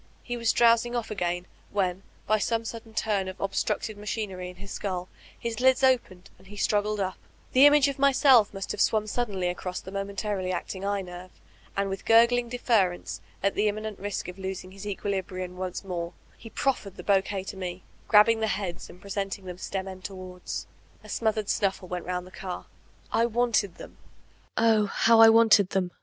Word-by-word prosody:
He 245 - -4
was 230 -1 +2
dfx>wsing 235 +1 +4
off 230 -2 -4
again, 175 -3 -2 0.2
when, 190 -2 -1 0.2
by 215 +1 +2
some 230 +1 0
sudden 225 -1 -8
turn 205 -4 0
of 185 +1 -6
the - - -5
obstructed 200 +2 -1
machinery 205 -4 -4
in 180 - -11
his 195 +2 -11
skull, 185 -2 -3 0.3
his 235 -1 -3
ttds 260 +1 +4
opened 195 -8 -1
and - - -18
he 205 - -11
struggled 210 +1 +1
np; 190 -1 -1 0.4
the 265 +3 +8
image 290 -1 +5
of 280 -1 -3
myself 270 -5 +5
must 195 -1 -5
have - - -2
swum 215 -1 +3
suddenly 205 -5 -2
across 180 +1 -3
the 190 - -10
momentarily 195 -1 -2
acting 185 +1 -4
eye 200 0 0
> - - -7
nerve, 180 0 -9 0.5
and 200 0 +1
with 195 0 -5
gurgling 235 +1 +5
deference, 220 -7 0 0.2
at 200 - +2
the 210 - +1
immanent 215 0 -3
risk 205 -1 -4
of 180 +1 -8
losing 190 -1 -5
his 195 +2 -9
equilibrium 190 -2 -3
once 185 +1 -4
more, 175 -3 -4 0.2
he 225 - -12
proffered 220 -5 -1
the - - -9
Iwuquet 195 -1 +1
to - - -7
me, 185 -1 -5 0.2
grabbing 220 +1 +6
the 220 - +1
heads 190 -4 -3
and 180 - -13
presenting 195 0 -4
them 180 -1 -7
stem 190 0 -4
end 185 -1 -8
towards. 185 -2 -6 0.4
A - - -13
smothered 220 -2 0
snuffle 190 -2 0
went 180 -1 -5
romid 180 0 -2
the 185 - -13
car. 185 -1 -6 0.5
I 230 - +3
wanted 230 -5 +1
them. - - -12 0.6
Oh, 220 -2 +4
how 225 +3 +5
I 225 - +10
wanted 225 -4 +6
them! 185 -2 -1
200 Hz, 190 wpm, -27 LUFS, 185-225 Hz, 0.6 s, I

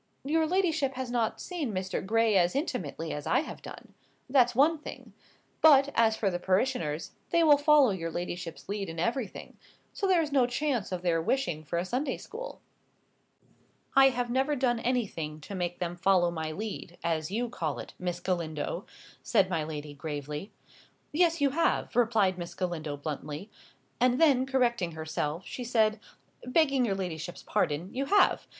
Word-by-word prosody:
"Your 315 +3 +1
ladyship 320 -7 +1
has 255 -1 -4
not 235 -3 0
seen 325 -10 -3
Mr. 185 -1 -3
Gray 225 +1 +2
as 180 +1 +3
intimately 175 - -3
as 150 - -5
I 260 - +3
have 315 - -8
done. - - -11 0.3
That's 250 -3 +4
one 305 +5 +4
thing. - - -10 0.5
But, 285 -3 +7
as 220 -1 +3
for 200 -3 +1
the 175 - -2
parishioners, 185 - 0 0.2
they 335 - +3
will 300 -2 +7
follow 290 -4 +5
your 165 -3 -3
ladyship's 175 0 -5
lead 200 -2 -3
in 165 - -7
everything; 230 +5 -3 0.4
so 395 - -1
there 360 -3 +4
is 300 - -5
no 265 -3 +4
chance 245 -5 -1
of 180 -1 -3
their 165 -2 +2
wishing 175 - -1
for 155 +3 -3
a 175 - 0
Sunday 260 +7 -1
school." - - -8 1.3
"I 270 0 +8
have 245 -1 -2
never 270 +4 +1
done 250 -3 +1
anything 190 -12 -2
to 175 - -9
make 175 -2 -2
them 175 -1 -3
follow 175 0 +3
my 160 -2 -3
lead, 185 -1 -6
as 160 -2 -1
you 235 +5 -1
call 160 - -3
it, - - -8
Miss 175 -1 -3
Galindo," 170 -5 -3 0.3
said 195 -5 +2
my 165 -3 0
lady, 150 -1 -6
gravely. 150 +4 -5 0.6
"Yes, 335 +1 +3
you 280 -1 +3
have," 330 +4 0
replied 215 -6 +3
Miss 170 0 -6
Galindo, 160 -5 -3
bluntly. 150 +5 -6 0.5
And 250 +1 +3
then, 275 -5 +4
correcting 240 -10 +1
herself, 160 +1 -3
she 250 - -6
said, 220 -3 +2 0.4
"Begging 275 -1 +3
your 200 -4 0
ladyship's 175 -3 -5
pardon, 155 +6 -1
you 270 +2 -1
have. 405 +6 +3
215 Hz, 170 wpm, -29 LUFS, 170-265 Hz, 1.3 s, I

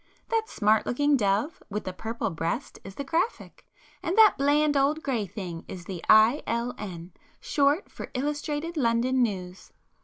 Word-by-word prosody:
—that 450 -1 0
smart 215 0 +2
looking 290 +3 +2
dove 210 +6 0
with 210 +1 -3
the 185 - -5
purple 225 +2 -3
breast 165 - -3
is 195 0 -10
the 280 - -4
'Graphic,' 335 - -3 0.3
and 350 +5 -2
that 440 -2 +7
bland 290 +1 +2
old 285 +3 +2
grey 235 -7 -1
thing 175 -3 -7
is 180 -2 -8
the 180 -3 -7
'I. 220 +6 +6
L. 235 +1 -1
N.' 175 -4 -7 0.3
short 290 +4 +1
for - - -8
'Illustrated 295 +4 -2
London 250 0 +2
News. 185 -5 -3
240 Hz, 160 wpm, -27 LUFS, 200-290 Hz, 0.3 s, that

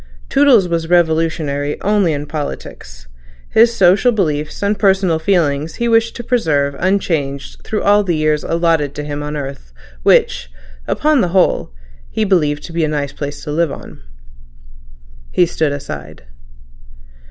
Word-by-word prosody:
Toodles 265 -9 +4
was 165 -1 -2
revolutionary 160 -4 0
only 205 -4 +2
in 145 -1 -3
politics; 100 - -7 0.4
his 230 +1 +5
social 195 +3 +4
beliefs 155 -6 -2
and 200 0 0
personal 190 -5 +2
feelings 160 -4 0
he 235 - -1
wished 225 0 +2
to 240 - -6
preserve 150 - 0
unchanged 160 -8 -1
through 215 - -3
all 205 +1 +4
the 175 -4 0
years 155 -1 0
allotted 165 -4 0
to 150 - -4
him 145 0 -5
on 150 0 -5
this 150 - -3
earth 135 - -9 0.3
which, - - +2 0.4
upon 305 -3 +2
the 180 - +1
whole, 180 - +2 0.4
he 220 - -1
believed 150 -7 +1
to 170 - -9
be 165 -1 0
a - - +2
nice 145 -2 -3
place 145 0 -6
to 150 - -5
live 165 0 0
on. - - -10 1.3
He 175 - +3
stood 160 -3 -1
aside. 145 - -7
160 Hz, 155 wpm, -17 LUFS, 145-195 Hz, 1.3 s, his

